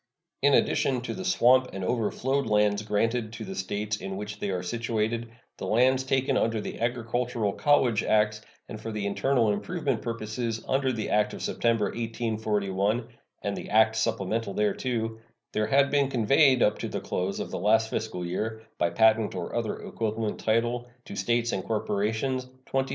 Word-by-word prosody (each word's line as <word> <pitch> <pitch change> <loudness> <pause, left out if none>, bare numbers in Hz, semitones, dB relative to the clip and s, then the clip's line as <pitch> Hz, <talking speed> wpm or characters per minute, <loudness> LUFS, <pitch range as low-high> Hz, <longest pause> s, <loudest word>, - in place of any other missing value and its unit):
In - - +5
addition 130 -3 +2
to 125 - -4
the 185 - -5
swamp 130 -8 +4
and 95 -1 -4
overflowed 125 +5 0
lands 105 -1 +3
granted 110 +2 0
to 115 -1 -6
the 95 - -6
States 105 +3 -2
in 95 -1 -5
which 105 0 -6
they 100 - -2
are 90 -1 -2
situated, 115 +3 -2 0.3
the - - -5
lands 130 +3 +3
taken 130 0 +1
under 115 -1 +1
the 105 - -6
agricultural 120 -2 -1
college 125 -7 +3
acts 110 0 +2 0.3
and 110 - -8
for 115 - -5
internal 110 +3 +1
improvement 140 - -2
purposes 115 0 -3
under 135 0 +1
the 110 -3 -3
act 105 0 +2
of - - -7
September, 115 -2 +1
1841, 110 -1 -1 0.3
and 100 -1 -1
the - - -7
acts 110 +1 +4
supplemental 110 -1 -1
thereto, 115 +1 -1 0.3
there 110 0 0
had 140 0 +3
been 140 -2 +3
conveyed 130 +2 +4
up 105 - +2
to - - -3
the - - -3
close 95 +2 -2
of - - -4
the - - -3
last 110 +1 +3
fiscal 90 -5 -3
year, 110 +5 -3 0.2
by 85 - +2
patent 110 +2 +3
or - - -4
other - - -2
equivalent 110 -1 -2
title, 120 +2 0 0.2
to - - -8
States 120 +4 +1
and 95 - -2
corporations 110 +5 -1 0.3
27,836,257. 135 0 +1
110 Hz, 170 wpm, -27 LUFS, 105-120 Hz, 0.3 s, In